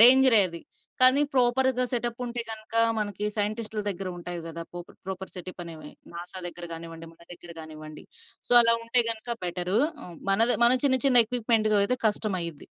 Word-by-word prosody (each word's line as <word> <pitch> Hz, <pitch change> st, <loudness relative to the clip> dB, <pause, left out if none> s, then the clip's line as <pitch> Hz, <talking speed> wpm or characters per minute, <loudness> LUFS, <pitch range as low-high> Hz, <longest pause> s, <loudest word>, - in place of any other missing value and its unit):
డేంజరే 250 Hz, -1 st, +8 dB
అది. 170 Hz, -1 st, -10 dB, 0.4 s
కానీ 255 Hz, +3 st, +6 dB
ప్రాపర్‌గా 255 Hz, 0 st, 0 dB
సెటప్ 240 Hz, 0 st, -4 dB
ఉంటే 240 Hz, 0 st, -6 dB
గనక, 220 Hz, 0 st, -8 dB, 0.2 s
మనకి 205 Hz, -1 st, -4 dB
సైంటిస్ట్‌ల 215 Hz, +1 st, -3 dB
దగ్గర 195 Hz, -1 st, -6 dB
ఉంటాయి 175 Hz, 0 st, -7 dB
గదా! 165 Hz, 0 st, -8 dB
పోప 175 Hz, 0 st, -9 dB, 0.2 s
ప్రాపర్ 190 Hz, 0 st, -8 dB
సెటప్ 180 Hz, 0 st, -9 dB
అనేవి 155 Hz, -3 st, -12 dB, 0.2 s
నాసా 175 Hz, +2 st, -7 dB
దగ్గర 175 Hz, 0 st, -7 dB
గానివ్వండి, 165 Hz, 0 st, -11 dB
మన 165 Hz, -, -27 dB
దగ్గర 175 Hz, 0 st, -11 dB
గానివ్వండి. 155 Hz, -1 st, -12 dB, 0.4 s
సో -, -, -1 dB
అలా 230 Hz, 0 st, +4 dB
ఉంటే 240 Hz, +1 st, +2 dB
గనక, 225 Hz, +1 st, -2 dB, 0.2 s
బెటరు 180 Hz, +3 st, -2 dB, 0.3 s
ఆహ్, 175 Hz, -2 st, -13 dB
మనది 225 Hz, +5 st, +3 dB
మన 240 Hz, -, +7 dB
చిన్న, 260 Hz, -2 st, +3 dB
చిన్న 245 Hz, -3 st, +6 dB
ఎక్విప్‌మెంట్ 225 Hz, -2 st, -1 dB, 0.2 s
అయితే 250 Hz, +5 st, -2 dB
కష్టం 210 Hz, -2 st, -3 dB
అయ్యిద్ది. 165 Hz, -4 st, -8 dB
210 Hz, 170 wpm, -24 LUFS, 175-240 Hz, 0.4 s, డేంజరే